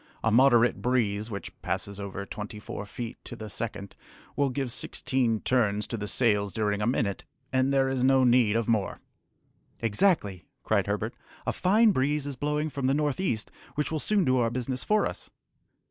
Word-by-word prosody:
A 115 - +2
moderate 120 0 +5
breeze, 110 -4 0
which 100 -3 -6
passes 100 0 -3
over 100 0 -5
twenty 105 +1 -7
four 105 -1 -7
feet 115 +3 -7
to - - -8
the 110 -2 -8
second, 100 -3 -5 0.4
will 140 -1 +2
give 130 -1 -3
sixteen 125 -4 0
turns 105 -5 +1
to - - -5
the 105 -2 -4
sails 105 -4 +1
during 105 -1 0
a 105 - +1
minute, 105 -5 0 0.3
and 130 +1 +2
there 135 -1 +3
is 135 -1 -1
no 135 0 +5
need 120 -3 +4
of 115 -1 0
more." 110 -4 0 0.8
"Exactly!" 105 - +2 0.2
cried - - +1
Herbert; - - -2 0.3
"a - - 0
fine 215 +4 +4
breeze 145 -2 0
is 140 -1 -4
blowing 150 +2 -1
from 140 -2 -1
the 135 - +3
north 150 -1 0
east, 115 - -1 0.2
which 150 +1 -1
will 160 - -1
soon 205 +3 +1
do 130 -1 +3
our 115 -1 +2
business 125 +1 -3
for 215 0 +2
us." - - -5
120 Hz, 185 wpm, -28 LUFS, 105-135 Hz, 0.8 s, moderate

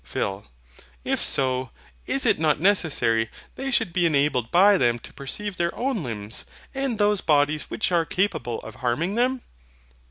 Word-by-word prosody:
PHIL. 95 +10 -4 0.6
If - - -1
so, 130 -1 +1 0.4
is 135 - +1
it - - +3
not 155 -2 +2
necessary 150 - +2 0.2
they 270 +1 -4
should 215 -8 0
be 175 -2 +3
enabled 140 -6 +1
by 200 +4 +6
them 120 -1 +3
to 115 - -13
perceive 185 +8 -5
their 170 0 -1
own 255 -5 -1
limbs, 110 -5 -6 0.3
and 270 -4 -2
those 205 -1 +2
bodies 150 0 +2
which 215 - -1
are 170 -2 +3
capable 160 - -1
of 110 - -10
harming 130 +10 -1
them? 250 +2 0
160 Hz, 160 wpm, -24 LUFS, 125-205 Hz, 0.6 s, by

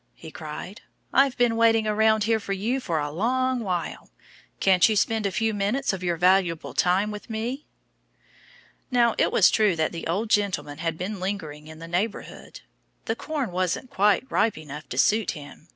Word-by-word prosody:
he - - -11
cried. - - -8 0.3
"I've 270 -1 +3
been 240 -2 +2
waiting 225 -1 +3
around 220 0 +3
here 220 +1 +2
for 200 -1 -4
you 225 +7 -1
for 170 -10 -2
a 145 -1 -2
long 255 +8 0
while. 185 -6 -4 0.5
Can't 190 +1 +4
you 215 - +1
spend 220 0 +1
a - - -3
few 225 +2 0
moments 205 +6 0
of 190 - -5
your 175 -2 -1
valuable 180 -2 +2
time 190 +4 +2
with 210 +3 -9
me!" 235 +6 -4 1.2
Now, 240 -2 +3
it - - +3
was 185 - +5
true 210 -5 +3
that 160 -1 0
the 170 - -6
old 205 +7 -2
gentleman 190 -8 0
had 165 -1 -2
been 190 +3 -4
lingering 160 -6 -5
in 160 0 -11
the 165 +1 -9
neighborhood. 185 +6 -4 0.4
The 225 - -1
corn 285 -5 -3
wasn't 185 +7 -2
quite 205 +5 +2
ripe 220 -5 +1
enough 150 0 -9
to - - -5
suit 215 0 +2
him. 150 +2 -12
205 Hz, 185 wpm, -25 LUFS, 175-225 Hz, 1.2 s, was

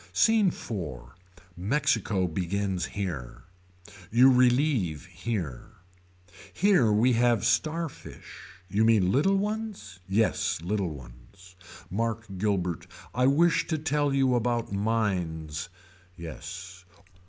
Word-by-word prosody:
SCENE 220 -3 +4
IV. 170 - -4 0.8
Mexico 105 -2 0
begins 95 +2 -2
here. 85 -12 -5 0.7
You 125 +5 +6
relieve 125 - +2
here. 90 - -5 0.8
Here 180 - +3
we 115 +5 +3
have 120 -2 +2
star 165 +2 +1
fish. 145 - -12 0.3
You 100 +3 +1
mean 110 -5 +4
little 180 - +3
ones. 205 - -4
Yes 105 -3 +1
little 100 0 -1
ones. 70 +7 -13 0.4
Mark 115 +2 -2
Gilbert. 90 -5 -1 0.3
I 125 +1 +2
wish 165 +5 +3
to 160 -2 -1
tell 150 -1 0
you 135 -2 +2
about 120 -2 0
mines. 90 -8 -2 0.5
Yes. 90 +2 -8
105 Hz, 105 wpm, -27 LUFS, 90-135 Hz, 0.8 s, You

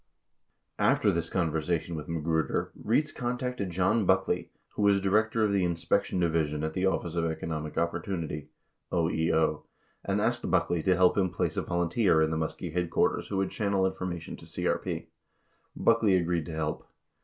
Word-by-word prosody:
13 - - +5
After - - +3
this 85 0 -1
conversation 85 -1 -1
with 75 - -6
Magruder, 80 -2 -1
Rietz 150 +8 +1
contacted 125 -4 -3
John 90 +4 +1
Buck 95 0 +3
ley, - - -1 0.2
who - - -5
was 100 -1 +4
director 110 +3 +2
of 105 -2 +2
the 100 -2 +2
inspection 90 +3 0
division 80 -3 0
at 80 0 -2
the 95 +2 +1
Office 85 -3 -1
of 85 -1 0
Eco 80 0 -6
nomic 75 -1 -4
Opportunity 85 -4 -2 0.4
(OEO) 80 -2 +1 0.4
and - - 0
asked - - 0
Buckley 85 -2 +1
to 95 +3 +3
help 90 +2 +4
him 95 -1 +2
place 90 - -2
a - - 0
volunteer 85 +1 +2
m 80 0 +2
the - - 0
Muskie 80 +1 -4
headquarters 90 -1 +1
who 100 - -3
would 95 0 0
channel 100 -3 +1
information 90 -3 -4
to - - -13
CRP. - - -2 0.7
Buckley 115 -4 +3
agreed 85 -2 0
to 85 - -6
help. 75 -1 -3
85 Hz, 170 wpm, -29 LUFS, 80-95 Hz, 0.7 s, 13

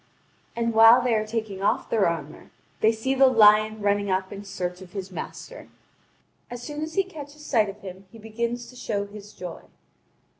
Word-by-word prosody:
And 230 0 -1
while 225 +3 +8
they 245 -2 +2
are 215 -1 0
taking 215 -3 -4
off 200 - 0
their 210 -6 +3
armour, 155 -3 -6 0.3
they 220 - +4
see 230 +4 -1
the 270 0 +6
lion 215 -2 +5
running 205 0 +1
up 190 +1 -1
in 200 0 -8
search 180 -2 -5
of 185 -1 -13
his 195 -1 -6
master. - - -8 0.8
As 245 0 -7
soon 295 +2 -6
as 320 +1 -5
he 390 - +3
catches 300 -5 -11
sight 220 -6 +2
of 205 +1 -10
him, 190 0 -10
he - - -13
begins 235 +2 -4
to - - -17
show 205 -4 -3
his 205 0 -11
joy. 180 -2 -8
215 Hz, 190 wpm, -25 LUFS, 200-240 Hz, 0.8 s, while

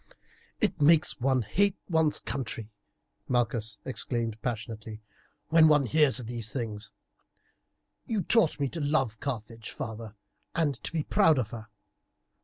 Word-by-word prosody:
"It - - 0
makes 155 0 +4
one 130 -1 +2
hate 195 - +1
one's 160 -3 +3
country," 115 -2 -5 0.6
Malchus 115 -3 0
exclaimed 115 -4 -2
passionately, 110 -1 -5 0.5
"when 160 0 +7
one 150 -3 +4
hears 145 0 +3
of 125 - -7
these 115 -2 -5
things. 110 -5 -5 1.2
You 215 -5 -1
taught 190 -6 +2
me 140 - +1
to 170 - -6
love 135 -7 0
Carthage, 115 -4 -5
father, 110 -1 -7 0.4
and 155 -4 +1
to - - -4
be 160 -2 -1
proud 175 -6 +4
of 110 -4 -1
her. 110 -2 -8
125 Hz, 135 wpm, -28 LUFS, 110-155 Hz, 1.2 s, when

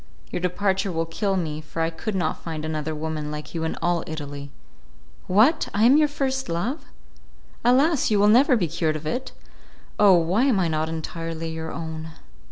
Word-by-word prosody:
Your - - -2
departure 190 +2 0
will 165 -1 -1
kill 195 +4 -1
me, 155 -3 -3
for 155 +2 -8
I 165 0 +1
could 200 +6 -4
not 165 -4 -1
find 160 -2 -5
another 155 0 -3
woman 155 -1 -4
like 150 0 -7
you 165 -1 -2
in 160 - -2
all 175 -1 +1
Italy." 145 -2 -6 0.8
"What! 225 - +4
am 225 +5 +6
I - - +6
your 305 0 +5
first 265 - -2
love? 215 - -2 0.8
Alas! 270 +5 +3
you 215 - +3
will 205 - +5
never 255 +5 +6
be 180 -6 0
cured 160 0 -1
of 155 0 -6
it. 250 +10 -3 0.7
Oh! 200 -3 +7
why 175 +9 +2
am 250 -8 +3
I 175 - +2
not 155 0 -1
entirely 165 0 -4
your 160 0 -5
own? 160 -1 -6
170 Hz, 185 wpm, -24 LUFS, 160-215 Hz, 0.8 s, Oh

